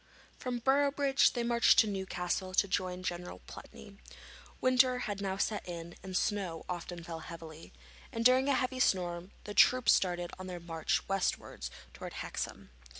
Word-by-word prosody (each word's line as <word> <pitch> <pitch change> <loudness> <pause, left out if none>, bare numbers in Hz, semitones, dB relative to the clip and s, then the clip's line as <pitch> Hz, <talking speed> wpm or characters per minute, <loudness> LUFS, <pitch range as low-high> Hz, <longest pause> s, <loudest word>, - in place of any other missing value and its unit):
From 250 -1 -2
Boroughbridge 275 +2 +3
they 240 - -1
marched 235 0 +4
to 220 - +6
Newcastle 185 -1 -2
to 200 - +4
join 185 -1 -2
General 175 -1 -4
Pulteney. - - -12 0.6
Winter 255 0 +4
had 200 -1 -4
now 190 -1 -2
set 210 +1 0
in, 170 0 -6
and 185 -1 -3
snow 190 -7 -1
often 175 -1 -5
fell 165 -1 -6
heavily, 165 -1 -10 0.4
and 230 -2 -3
during 260 +2 +5
a 275 - +4
heavy 255 0 -1
storm 180 -5 +1
the 205 - -6
troops 255 +4 +6
started 175 -2 0
on 185 - -6
their 180 -1 -5
march 165 -1 -1
westwards 195 -1 -2 0.2
to - - -9
Hexham. - - -6
190 Hz, 155 wpm, -32 LUFS, 175-245 Hz, 0.6 s, to